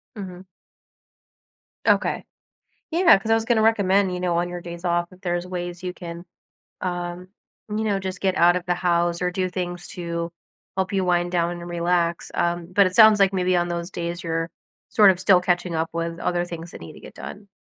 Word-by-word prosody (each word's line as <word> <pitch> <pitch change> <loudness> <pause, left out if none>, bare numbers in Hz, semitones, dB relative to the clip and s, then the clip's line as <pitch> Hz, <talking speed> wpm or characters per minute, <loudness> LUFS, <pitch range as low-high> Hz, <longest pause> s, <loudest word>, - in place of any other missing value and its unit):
Mhm. 185 -2 -8 1.4
Okay. - - +2 0.7
Yeah, 335 - +6
'cause 220 +3 -3
I - - +7
was 225 0 +1
gonna 225 -2 +3
recommend, 200 -3 +3
you 180 - -3
know, 175 -2 0
on 175 - +1
your 175 0 -6
days 170 +1 -8
off, 175 0 +1
if 185 +1 -17
there's 175 0 -2
ways 175 -1 -5
you 180 -1 -3
can, 170 -2 -8 0.6
um, 175 0 -4 0.4
you 215 +1 -1
know, 200 -2 0
just 190 0 -5
get 190 -1 +1
out 175 +1 +5
of 180 - -3
the 180 - +1
house 175 0 +1
or 180 0 0
do 185 0 -1
things 175 -1 -4
to 170 -1 -4 0.4
help 190 -1 -1
you 190 -2 0
wind 175 0 +1
down 170 -1 +1
and 175 0 -7
relax. 170 0 0
Um, 170 0 -1
but 200 +1 +6
it 185 - -5
sounds 220 -2 +8
like 195 0 +4
maybe 185 -1 +1
on 175 0 +1
those 170 0 -3
days, 170 -1 -4
you're 165 0 -2 0.4
sort 210 -5 +6
of 180 - -4
still 185 0 +5
catching 175 -1 0
up 160 +1 -1
with 170 0 -3
other 175 0 0
things 170 -1 -8
that - - -11
need 80 - -9
to - - -13
get - - -12
done. 200 0 -9
180 Hz, 210 wpm, -23 LUFS, 175-190 Hz, 1.4 s, sounds